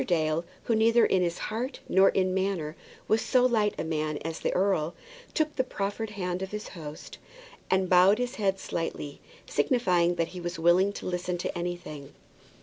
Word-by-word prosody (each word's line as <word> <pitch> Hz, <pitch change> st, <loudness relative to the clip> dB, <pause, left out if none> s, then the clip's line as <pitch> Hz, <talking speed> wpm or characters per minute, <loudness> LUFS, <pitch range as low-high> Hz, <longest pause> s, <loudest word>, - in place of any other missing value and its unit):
Dale, 160 Hz, -1 st, +1 dB, 0.2 s
who 230 Hz, -, 0 dB
neither 230 Hz, +2 st, +5 dB
in 180 Hz, -2 st, +2 dB
heart 225 Hz, +9 st, -4 dB
nor 190 Hz, +1 st, +5 dB
in 185 Hz, -1 st, +1 dB
manner 185 Hz, -5 st, -1 dB, 0.3 s
was 220 Hz, +1 st, +3 dB
so 250 Hz, -1 st, +3 dB
light 220 Hz, -4 st, +2 dB
a -, -, -2 dB
man 155 Hz, -2 st, -1 dB
as 165 Hz, 0 st, -3 dB
the -, -, 0 dB
earl, 180 Hz, -4 st, +1 dB, 0.4 s
took 310 Hz, -1 st, +1 dB
the 260 Hz, -, +2 dB
proffered 205 Hz, -2 st, -3 dB
hand 180 Hz, -3 st, -3 dB
of 190 Hz, -, -3 dB
his 210 Hz, +1 st, -6 dB
host, 155 Hz, -4 st, -9 dB, 0.5 s
and 190 Hz, 0 st, +2 dB
bowed 185 Hz, +3 st, +6 dB
his 245 Hz, +1 st, -2 dB
head 195 Hz, -3 st, +1 dB
slightly, 155 Hz, -5 st, -4 dB, 0.2 s
signifying 175 Hz, -, +2 dB
that 170 Hz, -1 st, -1 dB
he 185 Hz, -, -8 dB
was 175 Hz, 0 st, -4 dB
willing 175 Hz, +4 st, +4 dB
to -, -, -7 dB
listen 180 Hz, 0 st, -2 dB
to 175 Hz, -, -4 dB
anything. 175 Hz, -5 st, -5 dB
185 Hz, 175 wpm, -28 LUFS, 170-210 Hz, 0.5 s, bowed